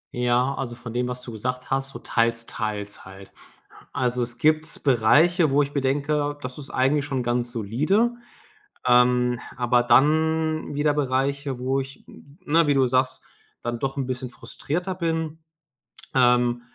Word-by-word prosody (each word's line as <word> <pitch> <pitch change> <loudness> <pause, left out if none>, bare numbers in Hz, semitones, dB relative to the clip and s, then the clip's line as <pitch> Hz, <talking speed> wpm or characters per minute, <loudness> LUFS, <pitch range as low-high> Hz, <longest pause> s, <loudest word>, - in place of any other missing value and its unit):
Ja, 125 +2 +1
also, 120 -3 -5
von 120 -1 -9
dem, 125 +1 0
was 125 0 -5
du 120 - -8
gesagt 125 +3 -4
hast, 135 0 0
so - - -8
teils-teils 110 -3 -2
halt. 95 0 -13 0.6
Also, 125 -1 0
es 120 0 -4
gibt 155 +3 +1
Bereiche, 150 - +4
wo 140 +2 +3
mir 140 0 -2
denke: 145 +2 0
„Das 125 +2 -6
ist 140 - -9
eigentlich 135 +3 +1
schon 135 -4 -2
ganz 120 0 -1
solide”, 145 - +1 0.8
ähm, 125 0 +4 0.2
aber 120 0 +2
dann 155 +5 +2
wieder 145 0 +2
Bereiche, 140 -1 -1
wo 130 +2 0
ich 135 0 -9
n 140 +3 -17
ne, 165 -1 +3
wie 145 - +4
du 135 -1 +3
sagst, 130 +1 0 0.4
dann 120 0 -3
doch 135 0 -2
'n 135 -2 -2
bisschen 130 0 -4
frustrierter 175 +8 -4
bin, 165 -2 -2 0.7
ähm, 125 -1 +3
130 Hz, 155 wpm, -24 LUFS, 120-145 Hz, 0.8 s, Bereiche